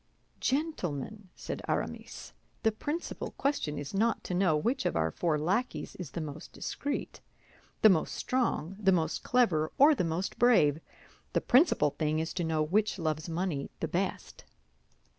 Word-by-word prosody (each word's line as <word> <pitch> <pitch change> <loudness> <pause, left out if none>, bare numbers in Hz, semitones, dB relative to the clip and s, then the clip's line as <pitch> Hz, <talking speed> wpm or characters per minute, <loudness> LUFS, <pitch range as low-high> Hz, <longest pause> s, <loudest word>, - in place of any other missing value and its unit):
"Gentlemen," 215 - -2
said - - -5
Aramis, - - -4 0.3
"the 220 - +4
principal 295 +10 -4
question 270 - -1
is 145 +4 -6
not 220 +3 +1
to - - -4
know 180 -4 +3
which 240 - 0
of - - -2
our 80 0 +1
four 160 - 0
lackeys 195 +12 -1
is 180 -6 -6
the - - -5
most 155 -1 -7
discreet, 285 0 -4 0.6
the 220 - +10
most 170 -5 +2
strong, 230 -9 -1
the 195 -2 +4
most 165 -3 +1
clever, 175 -12 +2
or 290 +3 +7
the 260 - 0
most 170 +3 -2
brave; 170 - +5 0.5
the - - +2
principal 255 - +4
thing 155 0 -1
is 160 +1 -2
to 175 - -2
know 160 -1 +1
which 205 +8 +1
loves 155 -1 -2
money 165 -4 -2
the - - -1
best." - - -3
180 Hz, 160 wpm, -30 LUFS, 155-235 Hz, 0.6 s, the